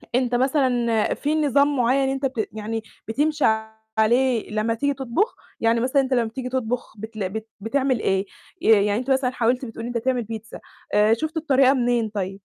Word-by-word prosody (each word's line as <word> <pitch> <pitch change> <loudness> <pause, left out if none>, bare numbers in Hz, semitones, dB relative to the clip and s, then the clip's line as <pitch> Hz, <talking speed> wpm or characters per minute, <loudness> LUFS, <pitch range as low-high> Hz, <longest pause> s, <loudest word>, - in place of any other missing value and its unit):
أنت 250 -1 +1
مثلًا، 245 -4 +1
في 295 +2 -1
نظام 285 -1 +3
معين 260 +2 +2
أنت 270 +1 -2
بت 245 -5 -2
يعني 220 +1 -4 0.2
بتمشي 295 +5 +1 0.5
عليه 240 +1 +2
لما 215 +2 0
تيجي 285 +5 0
تطبخ؟ 275 - -1 0.2
يعني 230 +1 +2
مثلًا 260 +4 +2
أنت 265 0 -2
لما 240 -2 +2
بتيجي 250 +2 -5
تطبخ 250 -1 -3
بتلا 215 -2 -5
بت 220 +3 -6
بتعمل 260 +3 0
إيه؟ 195 -1 0 0.4
آآ، - - +2
يعني 210 -1 +4
أنت 255 +2 -3
مثلًا 260 -1 +2
حاولت 250 +1 0
بتقول 225 -1 -8
إن - - -4
أنت - - +3
تعمل 255 -2 +1
بيتزا. 220 0 -8 0.3
آآ، 210 +1 +5
شُفت 315 +7 -3
الطريقة 275 -4 +4
منين 240 -3 +1
طيب؟ 195 -3 -3
245 Hz, 185 wpm, -23 LUFS, 220-270 Hz, 0.5 s, آآ